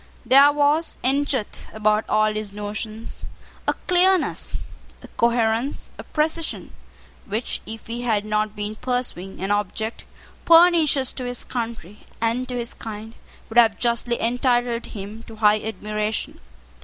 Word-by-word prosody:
There 275 +2 +7
was, 295 +3 +1
in 275 +3 +2
truth, 255 -8 -3
about 215 0 +1
all 215 0 +3
his 215 -1 -4
notions 215 +2 -6 0.5
a - - +3
clearness, 365 0 +2 0.5
a - - -9
coherence, 235 +2 0
a - - -6
precision, 315 +1 -2 0.5
which, 215 +4 -3
if 225 0 -8
he 235 +1 -5
had 220 -4 0
not 215 0 0
been 210 +1 -4
pursuing 245 -8 -3
an 195 +1 -1
object 210 +2 -2 0.4
pernicious 330 -6 +5
to 255 - -5
his 245 -1 -3
country 225 -5 -6
and 230 +3 0
to 250 - -3
his 235 -1 -3
kind, 220 0 -8 0.3
would 230 +2 +4
have 225 -3 +5
justly 235 0 0
entitled 240 0 +1
him 210 +2 -8
to 225 - -10
high 215 -1 +4
admiration. 215 0 -3
230 Hz, 140 wpm, -23 LUFS, 215-255 Hz, 0.5 s, There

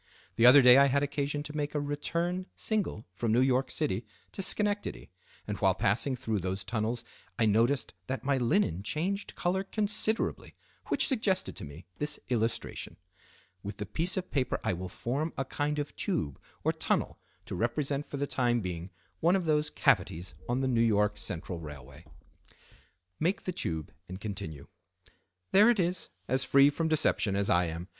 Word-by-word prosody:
The 115 - +6
other 135 +2 +9
day 125 +2 +9
I 140 - +6
had 140 +1 +2
occasion 145 0 -2
to 150 - -7
take 150 0 -3
a - - +2
return 170 +6 -2
single 210 - -2
from 110 +3 -1
New 115 - +4
York 130 0 +2
City 125 -9 0 0.3
to - - -5
Schenectady; 205 +2 -1 0.3
and - - -4
while - - +3
passing 125 +7 +1
through 110 -4 -2
those 95 +2 -3
tunnels 115 +1 -2 0.3
I 115 - +3
noticed 115 +5 +2
that 130 - -3
my 140 -1 +1
linen 120 - +1
changed 185 - -2
color 185 +2 0
considerably, 215 +2 -1 0.3
which - - +3
suggested 215 -8 0
to - - -6
me 75 +4 -11
this 150 0 -1
illustration. 115 -2 -2 0.6
With 100 0 -6
the 105 - -4
piece 165 - 0
of 185 - -3
paper 130 -3 0
I - - +1
will 90 +1 -5
form 140 - -2
a 135 - -1
kind 145 +2 -2
of 145 0 -4
tube 155 - -2 0.2
or - - +3
tunnel - - -1 0.3
to - - -7
represent 140 +4 -1
for 145 - -5
the 140 - 0
time 120 -3 +1
being 90 -3 -5 0.3
one 170 +3 +4
of 185 -3 0
those 150 -1 +2
cavities 95 - +1 0.2
on 125 +2 +1
the 135 - +1
N. 115 -2 +3
Y. 105 +1 +4
Central 90 -1 -4
railway." 75 -5 -10 1.1
Make 180 +5 0
the 185 - -3
tube 80 - -3 0.2
and 95 +1 -6
continue—"There 95 - -2
it 235 -4 +3
is, 180 0 0 0.2
as 130 +2 +2
free 140 +2 +5
from 160 +2 -1
deception 145 -9 +1
as 100 0 +1
I 90 0 +4
am. 85 +2 -5
130 Hz, 175 wpm, -30 LUFS, 105-155 Hz, 1.1 s, other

